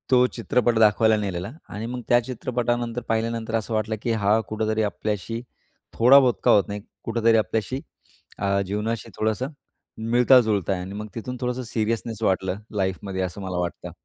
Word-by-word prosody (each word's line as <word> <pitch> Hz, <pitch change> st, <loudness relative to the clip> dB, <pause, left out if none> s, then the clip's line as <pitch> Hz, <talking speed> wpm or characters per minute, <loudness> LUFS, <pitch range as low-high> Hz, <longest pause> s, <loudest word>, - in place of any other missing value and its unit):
तो 125 Hz, -1 st, +6 dB
चित्रपट 120 Hz, 0 st, +1 dB
दाखवायला 110 Hz, +1 st, +5 dB
नेलेला 95 Hz, -1 st, -3 dB, 0.2 s
आणि 105 Hz, +2 st, -5 dB
मग 125 Hz, +1 st, -4 dB
त्या 120 Hz, -, +6 dB
चित्रपटानंतर 120 Hz, -1 st, -2 dB
पाहिल्यानंतर 115 Hz, 0 st, -1 dB
असं 115 Hz, 0 st, -2 dB
वाटलं, 110 Hz, 0 st, 0 dB
की 120 Hz, -, -1 dB
हा 105 Hz, 0 st, +3 dB
कुठेतरी 110 Hz, 0 st, 0 dB
आपल्याशी 105 Hz, +2 st, -3 dB, 0.5 s
थोडा 125 Hz, +4 st, +7 dB
बहुत 130 Hz, -3 st, +3 dB
का -, -, +5 dB
होत 100 Hz, -, +6 dB
नाही 105 Hz, 0 st, -5 dB, 0.2 s
कुठेतरी 115 Hz, 0 st, +3 dB
आपल्याशी 110 Hz, +4 st, -1 dB, 0.6 s
अ, 100 Hz, 0 st, +1 dB
जीवनाशी 105 Hz, +3 st, -3 dB
थोडंसं 110 Hz, +4 st, 0 dB, 0.6 s
मिळता-जुळता 120 Hz, -6 st, +4 dB
आहे 90 Hz, -, -3 dB
आणि 95 Hz, +2 st, -7 dB
मग 105 Hz, +1 st, -5 dB
तिथून 125 Hz, +2 st, -5 dB
थोडंसं 125 Hz, +1 st, -2 dB
सीरियसनेस 115 Hz, -1 st, -2 dB
वाटलं 95 Hz, -2 st, +1 dB, 0.2 s
लाईफमध्ये 95 Hz, 0 st, -2 dB
असं 95 Hz, +2 st, -4 dB
मला 95 Hz, -2 st, -4 dB
वाटतं. 90 Hz, -1 st, -4 dB
110 Hz, 160 wpm, -24 LUFS, 100-120 Hz, 0.6 s, थोडा